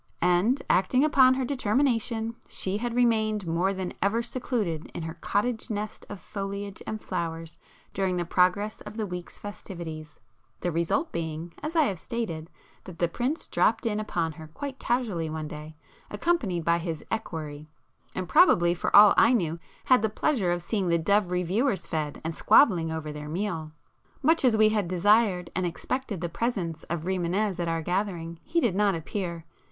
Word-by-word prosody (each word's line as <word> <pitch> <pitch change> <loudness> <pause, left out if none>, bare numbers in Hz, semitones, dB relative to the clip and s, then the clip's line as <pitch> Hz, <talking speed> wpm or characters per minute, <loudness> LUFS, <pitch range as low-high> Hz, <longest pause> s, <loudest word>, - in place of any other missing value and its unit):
And, 180 +10 +3
acting 255 +8 +3
upon 260 -4 +6
her 260 -1 -1
determination, 230 -3 0
she 190 +1 -2
had 240 +1 -3
remained 220 -4 +2
more 170 +3 +1
than 190 -2 -4
ever 220 +4 +1
secluded 225 - -2
in 170 - -4
her 160 0 -4
cottage 225 +4 -1
nest 215 0 -5
of 205 - -7
foliage 200 0 -5
and 215 - -3
flowers 165 -3 -4 0.3
during 185 -2 0
the 175 - -1
progress 185 +5 +1
of 215 - -9
the 220 - -1
week's 180 -2 -7
festivities,—the 170 -4 -8
result 170 - 0
being, 165 0 -4
as 305 +3 -4
I 320 - +5
have 195 - -1
stated, 170 -9 -4 0.4
that 180 -3 -10
the 170 - +2
Prince 250 - -2
'dropped - - +2
in' 215 -2 0
upon 170 -6 -1
her 155 +1 -10
quite 265 - -7
casually 220 -10 -1
one 155 -1 -4
day, 150 +1 -9 0.3
accompanied 210 - 0
by 170 0 +3
his 165 -3 -5
equerry, 155 -8 -4 0.5
and 185 -1 -3
probably 175 - +5
for 175 - -1
all 205 0 +10
I 230 - +6
knew, 170 -7 0 0.3
had 255 -4 +5
the 220 - +1
pleasure 215 -4 +1
of 175 -1 -1
seeing 195 0 -1
the 170 - +3
dove 200 +3 +2
'reviewers' 185 +4 0
fed, 155 -3 -3
and 160 +1 -3
squabbling 170 - +4
over 160 -1 -4
their 150 0 -7
meal. 165 -3 -3 0.5
Much 320 +3 +4
as 240 -4 +4
we 215 0 +6
had 210 -4 0
desired 185 0 +3
and 185 0 0
expected 215 +2 -3
the 175 - -1
presence 170 -4 -2
of 170 -1 -3
Rimânez 185 +2 -1
at 170 - -1
our 165 -1 -1
gathering, 175 -2 -2
he 335 +2 0
did 235 - +2
not 200 -1 +2
appear. 170 0 -4
190 Hz, 175 wpm, -27 LUFS, 170-225 Hz, 0.5 s, all